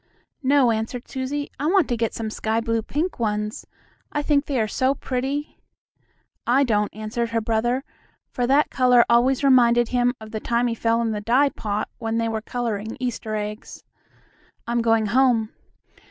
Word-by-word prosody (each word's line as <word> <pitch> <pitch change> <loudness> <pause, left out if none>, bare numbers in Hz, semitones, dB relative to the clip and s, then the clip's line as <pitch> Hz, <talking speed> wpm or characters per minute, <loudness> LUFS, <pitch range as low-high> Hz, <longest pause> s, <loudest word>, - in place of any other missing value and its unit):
"No," 270 -3 +4
answered 225 +3 -3
Susie, 275 +2 -4
"I 290 - -1
want 365 -2 +3
to 240 - +1
get 230 -1 -2
some 220 -1 -4
sky 220 +1 -1
blue 230 0 -1
pink 300 - -3
ones. 210 -1 -2 0.4
I 295 - -1
think 290 -1 +1
they 275 -4 0
are 220 - +1
so 260 +5 +1
pretty." 270 +4 -3 0.9
"I 260 +4 +4
don't," 210 -5 +1
answered 220 +2 -3
her 230 0 0
brother, 230 +4 0 0.5
for 245 -1 -1
that 280 +3 +3
color 250 -2 +5
always 250 +3 +3
reminded 240 -3 +5
him 245 0 +1
of 220 0 -11
the 220 - -3
time 235 +2 0
he 235 - 0
fell 230 +1 +1
in 225 - 0
the 210 -1 -3
dye 255 +7 +3
pot, 210 -4 -3
when 225 -1 -2
they 230 0 0
were 220 -1 -2
coloring 225 -2 -4
Easter 235 -3 -3
eggs. 210 0 -6 0.8
"I'm 235 0 0
going 225 -1 +2
home. 235 -1 +2
235 Hz, 175 wpm, -23 LUFS, 220-260 Hz, 0.9 s, color